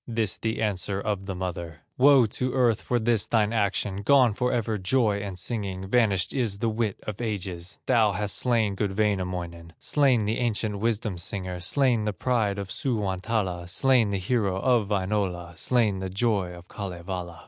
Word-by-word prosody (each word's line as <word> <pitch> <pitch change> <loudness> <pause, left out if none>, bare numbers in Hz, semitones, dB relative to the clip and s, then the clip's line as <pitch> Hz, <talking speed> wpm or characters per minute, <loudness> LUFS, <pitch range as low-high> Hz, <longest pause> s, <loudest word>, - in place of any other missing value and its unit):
This 115 -3 0
the 110 0 -2
answer 100 -1 -1
of 100 -2 -3
the 95 - -3
mother: 85 -4 -5
"Woe 135 -1 +6
to 125 +4 -3
earth 120 -5 +2
for 125 - 0
this 115 -2 +2
thine 110 -1 +2
action, 100 -2 0
Gone 125 0 +5
forever, 115 -2 -1
joy 105 +1 +2
and 100 -2 -5
singing, 95 -2 -3
Vanished 100 -5 +2
is 115 -7 0
the 115 +3 0
wit 110 -2 -2
of 110 +1 -6
ages! 95 -4 -4
Thou 110 -5 +3
hast 105 +1 -1
slain 115 -5 +1
good 100 0 -2
Wainamoinen, 90 -5 -2
Slain 130 -7 +2
the 110 +2 -1
ancient 110 -3 -1
wisdom 110 -4 -1
singer, 90 0 -4
Slain 120 +4 +2
the 105 - -1
pride 110 -2 0
of 100 -2 -5
Suwantala, 95 -6 -2
Slain 125 +2 +3
the 100 - -1
hero 95 -1 0
of 120 -3 +2
Wainola, 95 -4 -1
Slain 110 -5 +1
the 95 0 -4
joy 100 -2 0
of 90 0 -12
Kalevala." 90 -3 -6
105 Hz, 170 wpm, -26 LUFS, 95-115 Hz, -, Woe